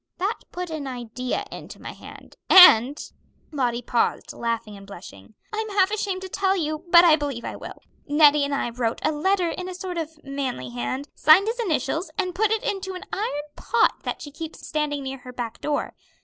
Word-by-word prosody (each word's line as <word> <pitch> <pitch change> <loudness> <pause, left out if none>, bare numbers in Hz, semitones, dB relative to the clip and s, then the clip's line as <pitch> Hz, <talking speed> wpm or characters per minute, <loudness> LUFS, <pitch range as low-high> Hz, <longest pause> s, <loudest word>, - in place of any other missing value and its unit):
That 395 +5 -1
put 360 -1 -5
an 300 -3 -4
idea 250 0 -4
into - - -10
my - - -7
head, - - -13
and 285 -7 +8 0.3
" - - -38
Lottie 245 -5 -1
paused, 235 0 -1
laughing 230 -2 -3
and 195 0 -13
blushing 175 - -12 0.2
"I'm 435 0 -2
half 395 -1 +2
ashamed 395 -3 -2
to - - -5
tell 385 +1 0
you, 310 0 -3
but 345 0 +8
I 325 -3 +7
believe 285 -6 -4
I - - -5
will - - -10 0.2
Nettie 295 -1 +5
and 280 0 -1
I 240 - -2
wrote 235 -1 -2
a - - +2
letter 355 +4 +1
in 365 +2 -5
a 365 - -6
sort 360 -1 -5
of 320 -1 -6
manly 270 - -4
hand, 125 - -4
signed 315 +6 +6
his 465 +2 -2
initials, 325 - -1
and 365 -3 -1
put 425 +3 +1
it 440 0 0
into 385 -1 -3
an 365 - -7
iron 340 -9 -2
pot - - +1
that - - -5
she 290 - -9
keeps 320 +2 -8
standing 295 -2 -2
near 270 0 -5
her 250 0 -10
back 240 -3 -6
door. 295 -1 -2
300 Hz, 205 wpm, -24 LUFS, 250-370 Hz, 0.3 s, and